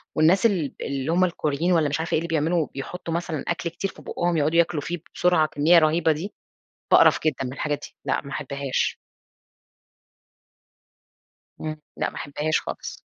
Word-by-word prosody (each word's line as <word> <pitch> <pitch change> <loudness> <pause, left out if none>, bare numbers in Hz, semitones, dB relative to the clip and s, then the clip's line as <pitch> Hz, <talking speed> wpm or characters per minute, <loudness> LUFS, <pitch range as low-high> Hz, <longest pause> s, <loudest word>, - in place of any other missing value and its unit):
والناس 170 +7 +4
ال 180 -10 +1
اللي 140 +1 -3
هُم 180 +2 +3
الكوريين 165 0 -1
وألّا 160 -4 +3
مش 150 - -1
عارفة 165 - -3
إيه - - +4
اللي 170 - -4
بيعملوا 165 0 +1
بيحطوا 165 +5 -5
مثلًا 165 -3 -2
أكل 170 0 -1
كتير 195 +4 -4
في - - -15
بُقهم 175 -1 -1
يقعدوا 155 +3 +2
ياكلوا 165 -3 +2
فيه 175 +4 -3 0.2
بسرعة 175 -3 +3
بكميّة 155 +3 +5
رهيبة 160 +1 +3
دي؛ 165 +7 -5 0.6
باقرف - - +7
جدًا 135 -4 +1
من 125 - -5
الحاجات 145 +1 -2
دي - - -25
لأ - - 0
ما 140 - -10
أحبهاش. 140 -1 -2 2.6
إمم، 155 -1 -5 0.2
لأ - - -1
ما - - -14
أحبهاش 150 +2 -1
خالص. - - -7
160 Hz, 170 wpm, -24 LUFS, 145-170 Hz, 2.6 s, باقرف